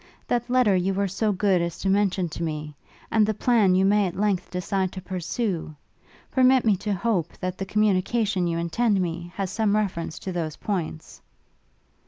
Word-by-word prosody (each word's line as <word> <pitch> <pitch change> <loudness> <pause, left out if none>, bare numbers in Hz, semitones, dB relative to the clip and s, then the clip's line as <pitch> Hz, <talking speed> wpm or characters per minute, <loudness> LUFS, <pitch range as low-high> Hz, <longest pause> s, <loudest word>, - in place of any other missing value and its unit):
That 240 0 -1
letter 250 -6 +4
you 185 +1 0
were 200 +1 +1
so 210 +3 0
good 190 -2 +2
as 170 -1 -3
to - - -4
mention 195 -2 +2
to 165 - -7
me? 155 -2 -3 0.4
and 220 -1 +4
the 215 0 0
plan 215 -5 +3
you 190 +1 +3
may 205 0 +3
at 175 - -6
length 195 -3 0
decide 185 +1 -1
to 190 - -6
pursue? 185 -2 -3 0.6
permit 260 -1 +4
me 215 -3 +4
to 210 +3 -3
hope, 185 -4 -1
that 185 0 -4
the 195 - -3
communication 205 -1 +1
you 170 0 -1
intend 200 +5 +1
me, 175 -1 -3
has 195 -2 -3
some 210 -1 +1
reference 185 -6 -2
to 190 - -5
those 165 -4 -3
points?' 170 -6 -4
195 Hz, 185 wpm, -25 LUFS, 175-210 Hz, 0.6 s, letter